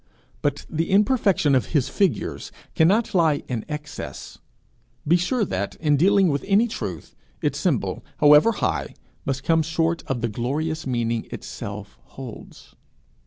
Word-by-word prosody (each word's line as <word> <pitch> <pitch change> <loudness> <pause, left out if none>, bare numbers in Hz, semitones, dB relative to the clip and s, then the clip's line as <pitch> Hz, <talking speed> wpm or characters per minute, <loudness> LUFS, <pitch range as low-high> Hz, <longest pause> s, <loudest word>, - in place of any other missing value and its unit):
But 145 0 -1
the 165 +1 -2
imperfection 200 - +3
of 130 - +2
his 130 - +1
figures 195 -6 -1 0.2
cannot 210 +7 +3
lie 160 -5 +2
in 120 -4 -3
excess. 150 -1 -7 0.7
Be 165 - +5
sure 205 +6 +1
that, 100 - -3
in 150 -2 +2
dealing 190 +4 +4
with 140 -1 -1
any 205 +4 +4
truth, 95 - -6 0.2
its - - -1
symbol, - - -1
however 150 +9 +6
high, 75 - -2 0.3
must 135 -1 -2
come 160 +1 +3
short 165 +1 0
of 130 -3 -2
the 120 - +1
glorious 145 +8 -2
meaning 115 -2 -1
itself 100 0 -8
holds. 130 -4 -11
150 Hz, 140 wpm, -23 LUFS, 125-180 Hz, 0.7 s, however